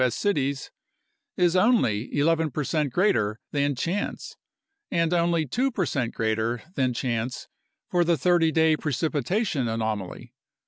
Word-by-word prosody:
S. 125 - +1
cities 140 -9 -1 0.7
is 175 0 +3
only 185 - +2
11 160 +2 +2
percent 150 +1 -1
greater 115 - +1
than 145 -1 0
chance 175 +10 -3 0.5
and 165 0 +1
only 170 -2 +2
2 250 - 0
percent 145 - -1
greater 110 +1 -1
than 130 -5 +1
chance 120 0 -3 0.4
for 175 -1 +2
the 170 -1 +2
30 165 +2 +3
day 160 -1 +4
precipitation 150 - -1
anomaly. 110 -4 -4
150 Hz, 125 wpm, -25 LUFS, 120-170 Hz, 0.7 s, day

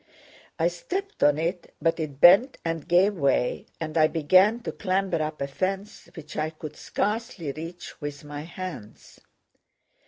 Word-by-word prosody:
I 165 - +3
stepped 380 - -4
on 145 0 +5
it, 170 +2 -3
but 165 0 +1
it 145 -4 -4
bent 200 - +7
and 165 -2 -3
gave 185 +4 +4
way 140 -7 0
and 155 -1 -5
I 155 - +6
began 185 +8 +4
to - - -4
clamber 185 -4 0
up 155 -1 -3
a - - -2
fence 195 +8 -4
which 155 -2 -10
I 155 +1 0
could 155 -1 -9
scarcely 210 - -2
reach 165 +4 -9
with 145 0 -6
my 145 0 -6
hands. 170 - -9
165 Hz, 155 wpm, -26 LUFS, 155-190 Hz, -, bent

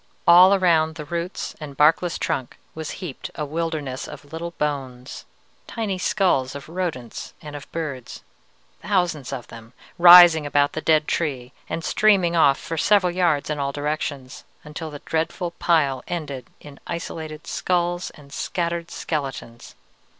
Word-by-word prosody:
"All 180 +3 +8
around 160 -4 +2
the 150 -2 -7
roots 170 +3 -4
and 145 -3 -9
barkless 165 +3 +3
trunk 130 - -3 0.2
was 160 -1 -6 0.2
heaped 140 -7 -7
a 150 - -3
wilderness 155 -4 -3
of 145 0 -12
little 170 +1 -4
bones. 135 -4 -4 0.4
Tiny 210 -5 -3
skulls 175 -10 +1
of 140 - -8
rodents 160 -9 -5
and 150 -1 -9
of 145 - -10
birds, 145 -7 -6 0.6
thousands 175 -9 -1
of 130 -3 -5
them, 115 +1 -12 0.3
rising 175 -2 +9
about 145 0 +2
the 155 - -3
dead 155 -1 +3
tree 130 -6 -2 0.2
and 165 - -3
streaming 190 -3 +3
off 140 -4 +5
for 165 - -6
several 190 0 +3
yards 170 -5 +1
in 150 - -3
all 140 0 -1
directions, 145 -2 -4 0.2
until 155 +1 -7
the 145 -1 -10
dreadful 165 +2 -2
pile 145 -6 +2
ended 145 -7 -5
in 145 -2 -13
isolated 160 -2 -6
skulls 175 0 -1
and 140 -1 -16
scattered 170 0 -3
skeletons. 135 -8 -5
155 Hz, 145 wpm, -23 LUFS, 140-170 Hz, 0.6 s, rising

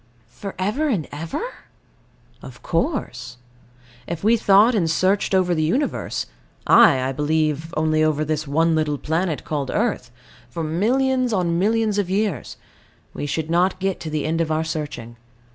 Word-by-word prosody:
For 190 +12 -8
ever 210 +12 0
and 190 - -1
ever? 160 - -4 1.0
Of - - -12
course. 125 - -2 0.7
If 170 +1 -5
we 225 +3 +5
thought 210 +2 +5
and 180 -7 +1
searched 190 +4 +1
over 180 -2 +2
the 160 - 0
Universe 240 - -1 0.4
ay, 130 - +6
I - - -1
believe, 155 +2 -1
only 155 0 +2
over 155 -1 +1
this 155 0 -2
one 165 +4 +2
little 155 -2 0
planet 160 +2 -2
called 145 -4 -3
earth 210 - -1 0.4
for 165 +7 -4
millions 250 +9 +1
on 170 -3 +1
millions 215 +1 +1
of 195 -3 -1
years, 195 - -2 0.6
we 145 - -4
should 160 +2 -3
not 180 +2 +2
get 190 0 -1
to 160 - -6
the 155 -1 -2
end 165 +2 0
of 160 -1 -1
our 155 +1 +1
searching. 145 -7 -5
165 Hz, 160 wpm, -22 LUFS, 155-200 Hz, 1.0 s, ay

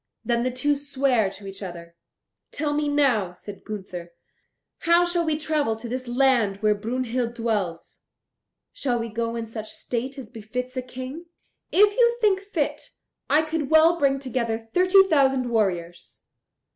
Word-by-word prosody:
Then 235 -1 +1
the 255 - 0
two 255 +4 +1
sware 275 -6 +1
to 195 +1 -12
each 195 +1 -9
other. 170 -3 -8 0.6
"Tell 295 0 -2
me 295 0 0
now," 250 -11 +2
said 200 +2 -11
Gunther, 185 -5 -7 0.7
"how 340 +1 +4
shall 345 0 0
we 315 -2 0
travel 300 -7 0
to 225 +2 -8
this 255 +2 -4
land 240 -5 +2
where 215 0 +4
Brunhild 240 +2 -2
dwells? 210 -8 -3 0.7
Shall 250 -3 -1
we 230 0 -3
go 230 +1 -2
in 230 -1 -3
such 220 -1 -7
state 255 +3 -4
as 245 -5 -9
befits 250 +3 -5
a 255 - -1
King? 255 +6 -8 0.5
If 410 +1 +5
you 475 -1 +4
think 410 -4 +3
fit, 395 +2 -2 0.5
I 310 +2 +4
could 310 -3 -3
well 320 +2 +5
bring 275 -1 +3
together 250 -4 -2
thirty 365 - +4
thousand 270 -8 +2
warriors." 175 -6 -2
250 Hz, 160 wpm, -24 LUFS, 220-290 Hz, 0.7 s, If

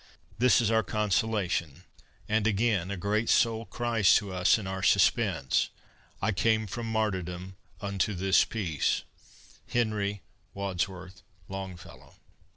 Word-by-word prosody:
This 125 +1 +5
is 115 -1 +1
our 110 0 +4
consolation; 105 -7 -1 0.4
and 110 0 +1
again 105 -4 +1
A 100 - -3
great 105 +4 0
soul 115 -2 +2
cries 115 -1 +2
to 100 -4 0
us 90 +3 +4
in 110 - -6
our 95 0 -4
suspense, 65 -7 +2 0.5
"I 105 - +2
came 110 +2 +1
from 115 +3 -5
martyrdom 95 -4 -2 0.3
unto 100 0 -1
this 95 +2 +4
peace!" 90 -10 -1 0.6
HENRY 105 -4 -1 0.3
WADSWORTH 95 -1 -4 0.3
LONGFELLOW. 95 -2 -9
100 Hz, 120 wpm, -28 LUFS, 95-110 Hz, 0.6 s, This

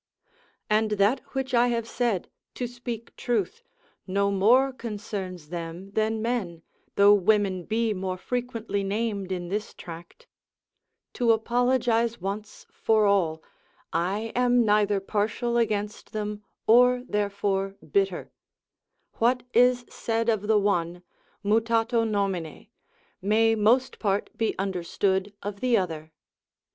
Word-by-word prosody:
And 215 +1 +2
that 205 +5 +3
which 265 -1 -3
I 240 0 +5
have 230 -2 -1
said 230 -7 -1 0.3
(to 250 - -2
speak 240 -1 -7
truth) 375 - -2 0.5
no 200 +1 +1
more 245 +8 +4
concerns 200 -8 -6
them 170 +3 -6
than 220 +1 0
men, 195 -9 -2 0.3
though 200 +1 +7
women 200 -2 +2
be 225 0 0
more 185 -1 -3
frequently 230 -2 -3
named 200 -1 -2
in 175 -2 -3
this 210 +3 -3
tract; 170 - -11 0.9
(to 240 -2 +3
apologise 235 0 +1
once 205 +3 -6
for 220 -1 +2
all) 170 -6 +1 0.5
I 195 +7 -1
am 245 -1 +3
neither 210 -1 +3
partial 215 +4 -1
against 210 -3 -1
them, 210 -1 -4 0.2
or 250 +2 +5
therefore 200 -1 -1 0.2
bitter; 395 -1 0 0.9
what 245 +2 +2
is 245 +1 +4
said 230 0 -2
of 210 -2 0
the 220 -1 +4
one, 175 -4 0 0.4
mutato 225 +2 +2
nomine, 195 -6 -2 0.5
may 220 +3 +3
most 225 +4 +2
part 200 -1 -1
be 225 - -1
understood 190 +1 -1
of 205 0 -5
the 250 0 +3
other. 160 -4 -3
210 Hz, 120 wpm, -26 LUFS, 195-235 Hz, 0.9 s, though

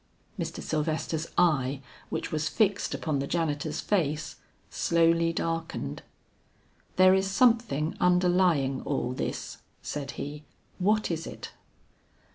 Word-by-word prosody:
Mr. - - -4
Sylvester's 155 +1 -1
eye 140 -5 +3 0.3
which - - -3
was 155 0 0
fixed 205 -3 +1
upon 155 -4 -1
the 140 - -2
janitor's 155 -2 -1
face, 155 -6 -1 0.3
slowly 165 0 +3
darkened. 165 - -3 0.9
"There 185 0 +7
is 190 0 +2
something 210 - +2
underlying 180 -6 +3
all 130 -3 -2
this," - - -4 0.2
said 145 -2 -4
he, 150 +1 -6 0.4
"what 210 +1 +2
is 165 0 -3
it?" - - -8
165 Hz, 110 wpm, -28 LUFS, 150-180 Hz, 0.9 s, There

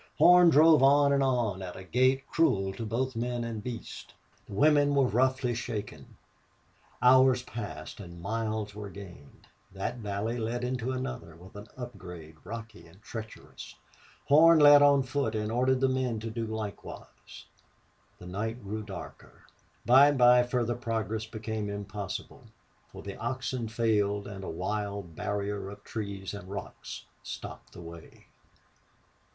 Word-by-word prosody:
Horn 180 -1 +7
drove 155 -1 +6
on 140 +1 +5
and 140 - +2
on 120 -8 0
at 90 -1 -7
a 95 - -9
gait 130 +6 +2
cruel 100 -13 +1
to 115 +2 -5
both 130 +3 -2
men 120 +1 -2
and 115 -2 -5
beasts. 120 -2 -7 0.4
The - - -10
women 145 +3 +4
were 140 -1 +4
roughly 125 +2 +1
shaken. 105 - -6 0.9
Hours 130 0 +6
passed 105 -11 -7
and 85 -3 -10
miles 110 +2 -3
were 105 -1 -7
gained. 90 -7 -13 0.3
That 95 +5 -4
valley 110 +2 -3
led 115 +2 -3
into 125 0 -2
another 130 -9 -5
with 90 +4 -15
an 105 +1 -9
upgrade, 90 -10 -9
rocky 110 -1 -9
and 85 +4 -19
treacherous. 110 -1 -9 0.5
Horn 160 +4 +7
led 145 -1 +8
on 140 -1 +5
foot 130 -4 -2
and 105 0 -2
ordered 130 +2 +2
the 135 - +4
men 130 -3 -1
to 115 0 -5
do 115 0 -3
likewise. 110 -2 -8 0.7
The - - -12
night 110 +6 -4
grew 105 +2 -4
darker. 100 -4 -10 0.4
By 130 +5 +7
and 145 -1 +1
by 125 0 +7
further 120 -1 -1
progress 110 -3 -3
became 110 -2 -4
impossible, 100 -1 -6 0.4
for - - -12
the 100 -1 -7
oxen 125 0 -3
failed 105 -3 0
and 100 -1 -8
a - - -5
wild 100 0 -4
barrier 100 0 -3
of 100 +1 -11
trees 100 -3 -5
and 95 -2 -9
rocks 100 0 -7 0.2
stopped - - -9
the - - -10
way. 85 -1 -12
110 Hz, 150 wpm, -29 LUFS, 100-130 Hz, 0.9 s, led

